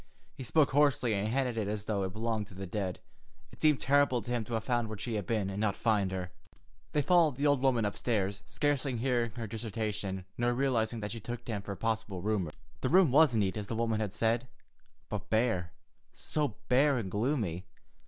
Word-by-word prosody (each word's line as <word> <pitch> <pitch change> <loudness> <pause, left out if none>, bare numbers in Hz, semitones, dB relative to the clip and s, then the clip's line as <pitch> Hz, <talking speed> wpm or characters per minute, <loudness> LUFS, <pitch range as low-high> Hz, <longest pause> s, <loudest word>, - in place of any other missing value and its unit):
He 130 - -8
spoke 145 +4 +3
hoarsely 140 -5 +3
and 100 +1 0
handled 125 0 0
it 105 -3 -1
as 105 0 -3
though 105 -2 -1
it 95 -1 -2
belonged 110 0 -2
to 100 - -13
the 95 +1 -5
dead. 95 -1 -3 0.5
It - - -16
seemed 150 -3 +4
terrible 140 -4 +3
to 120 - -6
him 120 -2 0
to 120 - -6
have 110 - -2
found 120 0 0
where 110 - -5
she 115 +3 -4
had 105 -4 -2
been, 110 -4 0
and 100 +2 -3
not 110 -2 +1
find 105 -4 +1
her. 90 -1 -4 0.6
They 150 - +2
followed 165 -4 +4
the 140 +3 -1
old 145 -3 +3
woman 125 -5 +3
upstairs, 100 -2 -1
scarcely 140 -3 0
hearing 120 -1 +1
her 115 0 -5
dissertation, 105 -3 -3
nor 120 0 +2
realizing 120 -4 0
that 105 -1 -3
she 115 - -5
took 120 +3 -6
them 105 -4 -3
for 100 0 -5
possible 110 -4 -2
roomers. 100 -7 -1 0.2
The 130 - -1
room 180 -2 +5
was 145 -2 +5
neat, 100 -4 +1
as 105 -2 -4
the 115 - -3
woman 115 -1 0
had 105 -3 -2
said, 115 +4 0 0.6
but 105 -1 -5
bare—so 110 - -2
bare 140 +2 +4
and 100 -6 -3
gloomy! 105 - -1
110 Hz, 205 wpm, -31 LUFS, 100-125 Hz, 0.6 s, room